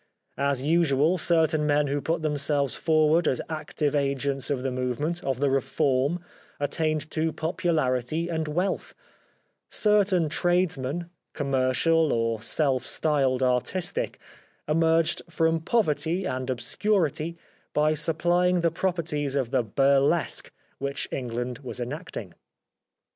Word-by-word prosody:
As 140 -2 0
usual, 160 +1 +3
certain 160 -2 +2
men 145 0 +3
who 145 +1 -1
put 160 +3 -1
them 150 -1 0
selves 140 -2 0
forward 155 +1 +3
as 130 - +1
active 155 -2 -2
agents 140 -1 0
of 135 -3 -1
the 135 - -1
movement, 130 +7 -2
of 135 -2 -1
the 140 - +2
reform, 135 +3 +1 0.4
attained 155 +2 -1
to 160 0 0
popularity 160 -3 -1
and 160 -2 -2
wealth; 180 +6 -2 0.7
certain 200 -5 +3
tradesmen, 170 -1 0 0.2
commercial 140 +3 +2
or 115 -1 0
self 130 +2 +1
styled 135 -4 +1
artistic, 130 +8 -1 0.5
emerged 165 +1 +2
from 165 0 +1
poverty 165 -2 0
and 130 0 -3
obscurity 160 - 0 0.3
by 150 +1 +2
supplying 175 +3 +1
the 170 -1 +2
properties 160 -5 -1
of 130 -4 -1
the - - +3
burlesque 140 +6 +2 0.3
which 140 0 -2
England 125 -1 -3
was 130 -2 -7
enacting. 120 - -6
150 Hz, 120 wpm, -26 LUFS, 135-165 Hz, 0.7 s, usual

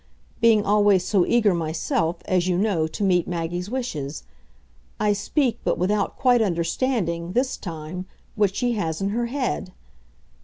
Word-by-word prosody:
being 225 -3 +4
always 205 -3 +4
so 185 -2 +2
eager 220 -5 +3
myself, 165 0 -1
as 185 -1 +1
you 180 -1 +1
know, 185 -6 +1
to 180 - -5
meet 180 -3 +2
Maggie's 175 +2 -3
wishes. 160 - -4 0.8
I 210 0 +3
speak, 235 +3 0
but - - 0
without 200 +3 0
quite 245 -3 +4
understanding, 170 -1 -1
this 255 +3 +1
time, 170 +1 -7 0.3
what 205 -2 +1
she 245 +1 0
has 165 -8 -2
in 195 0 -1
her 235 +3 -1
head. 250 -7 -3
195 Hz, 150 wpm, -24 LUFS, 170-225 Hz, 0.8 s, being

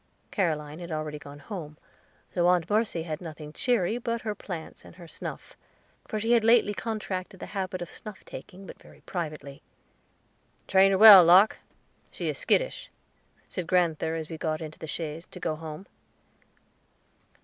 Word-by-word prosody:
Caroline 155 -5 -1
had 175 -1 -8
already 155 -1 -4
gone 145 -1 -11
home, 150 0 -8 0.6
so 175 -1 +2
Aunt 180 -2 +3
Mercy 210 -5 0
had 155 -1 -5
nothing 155 -3 -9
cheery 235 -1 +1
but 235 -1 -2
her 215 -2 -2
plants 175 -5 -8
and - - -14
her 175 -2 -12
snuff; - - -8 0.5
for 215 - -3
she 225 +2 -1
had 235 -2 +5
lately 225 -2 +4
contracted 200 -3 -4
the - - -6
habit 185 -2 -3
of 175 - -11
snuff 210 -3 -10
taking 195 +1 -10
but - - -12
very - - -17
privately. 155 -5 -6 1.1
"Train 195 0 +5
her 195 - +2
well, 205 -3 +11
Locke; 185 +5 +6 0.5
she - - -5
is - - -3
skittish," - - 0 0.6
said 180 -3 -5
grand'ther 165 -3 +1
as 160 -1 -4
we 160 -1 -8
got 155 -1 -1
into 155 -2 -8
the 160 - -7
chaise 160 +1 -5
to - - -11
go 160 -2 -2
home. 155 +3 -8
175 Hz, 165 wpm, -27 LUFS, 155-205 Hz, 1.1 s, well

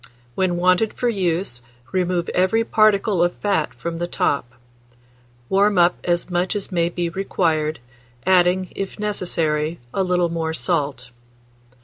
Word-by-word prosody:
When 180 +3 0
wanted 185 +5 +2
for 245 - 0
use, 175 - -1 0.3
remove 180 -2 0
every 190 +5 +2
particle 215 -4 +3
of 175 - 0
fat 195 -7 0
from 170 -1 -5
the 175 - -2
top; 140 -7 -1 1.0
warm 200 +3 +3
up 175 0 +5
as 175 -1 0
much 180 +2 -1
as 200 -1 -3
may 170 -2 +1
be 175 0 -2
required, 165 -4 0 0.5
adding, 185 0 +3
if 195 -1 -5
necessary, 165 -6 -1
a 195 - 0
little 180 -2 +1
more 160 -1 -2
salt. 140 -8 -2
175 Hz, 135 wpm, -21 LUFS, 165-190 Hz, 1.0 s, up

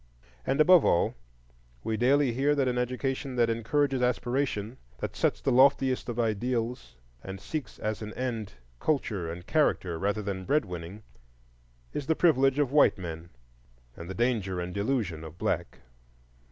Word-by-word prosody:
And 135 - +1
above 175 +2 +7
all, 85 - +2 0.7
we 110 - -1
daily 130 +2 +3
hear 140 +4 +2
that 135 -2 +1
an 125 0 0
education 130 +2 -2
that 120 -2 +3
encourages 130 +4 0
aspiration, 125 -2 -1 0.2
that - - -5
sets - - 0
the - - +1
loftiest 130 0 +4
of 120 0 -3
ideals 115 - -1 0.3
and 95 0 -7
seeks 130 +1 -5
as 110 0 -3
an 105 0 -5
end 115 -5 -3 0.3
culture 105 - -1
and 85 +1 -8
character 95 - +1
rather 100 +3 -1
than 95 -2 -4
bread 150 +1 +2
winning, 90 +3 -8 0.9
is 145 - -4
the 160 - +2
privilege 135 -6 +3
of 145 -3 +1
white 150 -5 +5
men 85 -2 -7 0.7
and 85 +1 -9
the 95 - -5
danger 110 -7 0
and 90 0 -4
delusion 100 -7 -1
of 80 +1 -10
black. 65 -6 -2
120 Hz, 155 wpm, -28 LUFS, 95-135 Hz, 0.9 s, above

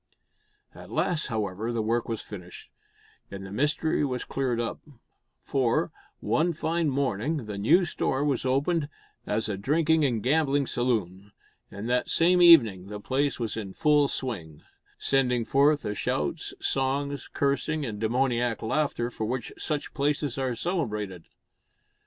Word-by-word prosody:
At - - -12
last 170 -4 0
however, 110 -1 -2
the 115 -2 -1
work 115 +2 0
was 115 -2 -3
finished, 90 -4 -10 0.6
and 95 -1 -7
the 95 - -9
mystery 150 +7 +1
was 125 -3 -2
cleared 130 -3 -1
up, 115 - -3 0.6
for, 130 -4 +1 0.3
one 170 +2 +1
fine 165 0 0
morning, 135 +1 -1
the 105 -2 -5
new 165 - +4
store 140 -4 -1
was 140 -4 0
opened 145 +4 +1 0.4
as 105 +1 0
a 100 -3 -2
drinking 155 +8 +2
and 120 -7 0
gambling 145 0 +2
saloon; 105 -6 -2 0.4
and 100 +3 -6
that 125 +1 +1
same 180 +2 +4
evening 115 - +7
the 105 0 -6
place 135 +6 0
was 115 -2 -2
in 100 -4 -5
full 150 +2 +3
swing 90 - -4 0.3
sending 125 -4 +1
forth 145 +3 +3
the 105 - -2
shouts, - - -2
songs, 140 +1 -1
cursing 140 +2 0
and 105 -4 -5
demoniac 120 +1 0
laughter 120 -1 0
for 110 - -4
which 125 0 -3
such 150 -2 -3
places 145 -2 0
are 130 -2 -1
celebrated. 105 - -3
130 Hz, 145 wpm, -27 LUFS, 110-145 Hz, 0.6 s, evening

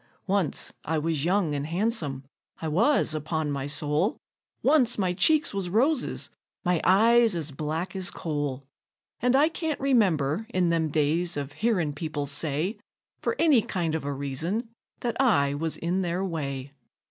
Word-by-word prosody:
Once 195 -6 0
I 160 - -1
was 155 -1 -1
young 180 -3 +2
an' 145 0 -2
han'some 165 - -1 0.4
I 160 - -3
was, 200 - +2
upon 155 0 -2
my 140 -1 -3
soul 150 +7 0 0.5
Once 265 -5 +4
my 185 -3 +1
cheeks 310 - +3
was 195 -3 -2
roses, 260 - +1 0.3
my 175 -2 +2
eyes 225 +3 +5
as 155 -3 -3
black 155 +6 -3
as 190 -2 -2
coal; 145 -4 -3 0.6
And 250 +1 +2
I 290 +3 +5
can't 320 -2 -3
remember, 205 - +2
in 185 -7 +1
them 165 -2 +1
days, 160 +3 +1
of 140 -1 -4
hearin' 175 -2 0
people 145 -1 -3
say, 150 - -1 0.4
For 460 - -1
any 300 -8 +5
kind 170 -6 -2
of 160 - -2
a 145 - -2
reason, 155 - -3 0.3
that 240 +2 -1
I 140 - +3
was 160 +2 -2
in 175 +3 -1
their 180 +1 -1
way. 140 -5 -4
170 Hz, 160 wpm, -27 LUFS, 150-215 Hz, 0.6 s, eyes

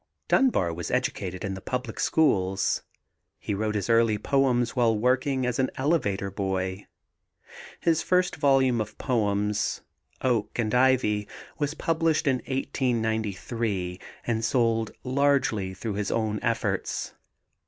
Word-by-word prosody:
Dunbar 95 - +3
was 85 0 -5
educated 100 -7 -2
in 100 - -2
the 95 - -7
public 125 -1 -4
schools. 95 -11 +2 0.6
He - - -4
wrote 105 +1 -1
his 100 -2 -1
early 115 -2 +4
poems 125 0 +1
while 115 -3 +3
working 130 +3 +1
as 125 0 -1
an 130 - +2
elevator 105 -10 0
boy. 95 0 -3 0.9
His 165 -1 +2
first 180 0 +2
volume 135 -5 +3
of 105 0 -6
poems, 105 -4 0 0.4
Oak 115 -5 0
and 110 -3 0
Ivy, 125 -5 +3 0.3
was 150 0 -1
published 165 -1 +1
in 135 -2 +3
1893 110 -7 -2 0.3
and 115 -1 -1
sold 115 -2 +1
largely 130 -7 +1
through 105 +3 -4
his 100 -1 -2
own 110 -2 0
efforts. 115 0 -1
115 Hz, 125 wpm, -26 LUFS, 105-130 Hz, 0.9 s, early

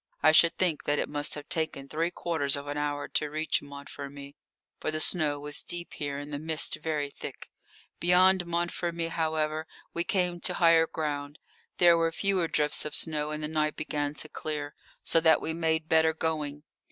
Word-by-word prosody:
I 155 - +7
should 165 +1 +5
think 175 -5 0
that 145 - +2
it - - -1
must 145 0 -2
have 145 0 -8
taken 155 -4 -2
three 165 +4 -1
quarters 160 -5 0
of 140 0 -5
an 145 0 -4
hour 145 0 -2
to 150 - -1
reach 155 +2 0
Montfermeil, 140 0 -9 0.5
for - - -2
the 155 0 -1
snow 155 -3 +3
was 145 0 -2
deep 175 0 -6
here 145 -1 -4
and 145 +1 -7
the 145 - -3
mist 160 0 +1
very 150 -3 -2
thick. - - -9 0.5
Beyond 180 +1 +4
Montfermeil, 170 -1 -2
however, 155 -1 -1 0.3
we 170 - 0
came 180 -2 0
to - - 0
higher 165 -1 +5
ground; 145 -2 -4 0.4
there 175 -1 +6
were 165 0 +1
fewer 190 0 +1
drifts 150 -1 +1
of 150 - 0
snow, 150 -2 +1
and 150 0 -4
the - - 0
night 155 -1 0
began 145 -1 -3
to 155 - -2
clear, 150 -1 -5 0.3
so 165 - +4
that 160 -1 +5
we 160 - -2
made 160 -1 0
better 160 0 +4
going. 150 -3 -2
155 Hz, 190 wpm, -28 LUFS, 145-165 Hz, 0.5 s, I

